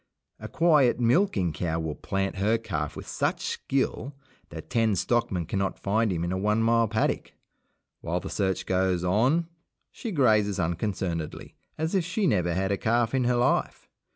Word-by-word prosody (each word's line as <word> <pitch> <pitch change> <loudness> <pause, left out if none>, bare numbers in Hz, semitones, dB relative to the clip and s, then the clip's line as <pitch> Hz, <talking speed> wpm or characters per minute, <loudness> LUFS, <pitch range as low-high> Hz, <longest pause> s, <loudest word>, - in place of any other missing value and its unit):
A - - -7
quiet 150 -8 +3
milking 115 - +2
cow 80 -1 -2
will 80 -2 -3
"plant" 95 +6 -3
her 105 +4 +2
calf 80 -10 -4
with - - -8
such - - -1
skill 135 0 -2 0.3
that - - -10
ten 115 -3 +2
stockmen 95 -4 0
cannot 95 +3 -2
find 110 +2 0
him 85 -2 -2
in 85 - -2
a 95 - -1
one 105 +3 +1
mile 115 0 +3
paddock. 110 +1 -1 0.7
While 85 +2 -2
the - - -7
search 95 -2 -1
goes 95 -1 +1
on 125 - +2 0.4
she 235 - -6
grazes 110 - +3
unconcernedly, 85 -1 -3 0.2
as 160 +3 -2
if 190 -3 +2
she 185 +5 -1
never 90 - +1
had 95 +1 0
a 100 - +1
calf 115 +2 +1
in 130 -2 +1
her 125 0 +2
life. 120 0 0
105 Hz, 170 wpm, -27 LUFS, 90-120 Hz, 0.7 s, quiet